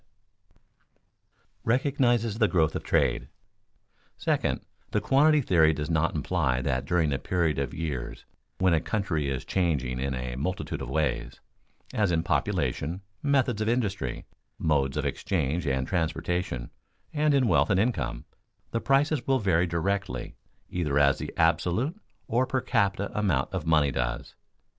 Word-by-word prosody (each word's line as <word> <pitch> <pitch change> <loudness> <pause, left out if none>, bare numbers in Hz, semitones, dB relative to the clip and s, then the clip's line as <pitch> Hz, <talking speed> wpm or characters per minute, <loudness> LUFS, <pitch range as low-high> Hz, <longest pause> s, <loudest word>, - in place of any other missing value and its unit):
[Sidenote: - - -42 0.2
Recognizes 120 -3 +1
the 110 - +5
growth 80 -5 +2
of - - -2
trade] - - +1 0.9
Second, - - 0 0.3
the - - +1
quantity 150 +2 +4
theory 80 - +4
does 75 +3 -3
not 80 +1 +1
imply 65 -1 0
that 65 0 -1
during 80 -3 +1
a 70 - -1
period 85 -5 0
of 70 -3 -2
years 75 -6 -5 0.3
when 95 -2 +3
a 80 - +4
country 85 -10 -1
is 65 -2 -3
changing 70 -9 0
in 65 0 -1
a 60 -1 -4
multitude 90 +8 -3
of - - -5
ways, 75 -1 -1 0.5
as 105 -4 +2
in 80 -1 +1
population, 85 +7 -1 0.2
methods 130 -6 +1
of 110 - +1
industry, 100 - -1 0.3
modes 70 -4 +1
of - - -1
exchange 80 -2 -1
and 65 -1 0
transportation, 85 -5 -2 0.4
and 150 -1 +2
in 130 -3 +3
wealth - - +3
and 95 -2 +3
income, 70 - -1 0.5
the 115 - -1
prices 140 +1 +2
will 135 -1 +4
vary 95 -6 +2
directly 95 +4 -2 0.4
either 75 -5 0
as 70 -1 +4
the - - -5
absolute 85 - +2 0.3
or 125 +3 +1
per 130 - 0
capita 100 -3 0
amount 95 -11 0
of - - -3
money 75 -3 +4
does. 65 -1 -3
85 Hz, 150 wpm, -27 LUFS, 70-110 Hz, 0.9 s, the